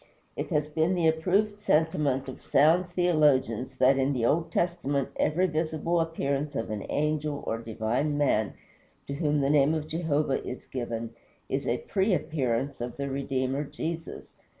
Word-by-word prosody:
It - - -4
has 150 -4 +1
been 160 +4 +1
the 170 -2 +2
approved 195 +6 +1
sentiment 150 -8 +1
of 130 - -8
sound 165 +6 +3
theologians 145 -9 +2
that 130 +1 +4
in 135 +2 +2
the 120 -3 0
Old 160 +6 +1
Testament 145 -6 0
every 175 +5 +2
visible 160 0 0
appearance 145 -3 -1
of 115 - -3
an 105 -2 -4
Angel 150 -1 -1
or 115 - -2
divine 115 +6 -1
Man 110 -8 +1 0.5
to 140 - -5
whom 150 0 +1
the 135 - +1
name 150 +1 +4
of 155 -1 -3
Jehovah 155 -4 0
is 125 - -7
given 115 -2 -4 0.4
is 135 +1 -2
a 120 - +1
pre 195 0 +2
appearance 140 -4 -1
of 120 0 -5
the 140 -1 -3
Redeemer, 135 0 -1
Jesus. 165 +3 -6
145 Hz, 160 wpm, -28 LUFS, 130-160 Hz, 0.5 s, that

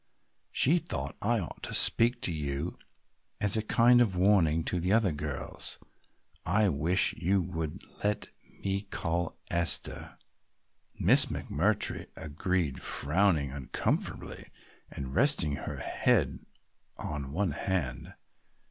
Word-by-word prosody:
She 165 +7 +4
thought 70 - -5
I 120 +3 +2
ought 85 - -7
to - - -3
speak 120 +1 +4
to - - +1
you 75 +1 -3 0.6
as 105 -1 +4
a 110 - +2
kind 120 +3 +4
of 105 -6 +2
warning 90 -4 +3
to 90 - -1
the 90 +3 -1
other 110 -4 +3
girls. 75 -1 -4 0.7
I 105 +5 +2
wish 85 +5 +2
you 95 +4 +1
would 85 -1 -4 0.2
let 105 0 -1 0.3
me 100 0 0
call 85 -4 -3
Esther." 85 0 +1 0.8
Miss - - +5
McMurtry - - -1
agreed, 80 -1 -2
frowning 75 -2 +2
uncomfortably 70 -1 -3 0.4
and 65 -1 -6
resting 90 - +3
her - - -6
head - - 0 0.5
on 70 -3 -5
one 90 +2 0
hand. 75 -5 -3
90 Hz, 120 wpm, -29 LUFS, 75-100 Hz, 0.8 s, Miss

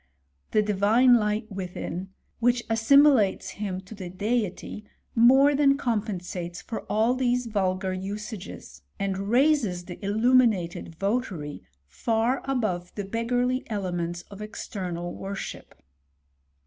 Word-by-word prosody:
The 215 - +3
divine 210 +5 +4
light 210 +1 -1
within, 185 -1 -5 0.3
which 240 0 +2
assimilates 235 -2 +4
him 195 -3 -4
to 190 +3 -12
the 190 -4 -7
Deity, 210 +1 -2 0.3
more 265 +5 +6
than 280 -1 +4
compensates 185 -8 -3
for 225 - -6
all 220 +3 +3
these 250 -1 +1
vulgar 190 -3 -1
usages, 195 - -7 0.2
and 195 0 -2
raises 240 - +2
the 175 +3 -9
illuminated 210 -6 +2
votary 195 - -2 0.2
far 230 - 0
above 215 -10 -1
the 205 - -4
beggarly 245 +4 0
elements 175 -4 -3
of 200 +1 -9
external 180 -5 -5
worship. 195 0 -7
210 Hz, 110 wpm, -26 LUFS, 185-240 Hz, 0.3 s, more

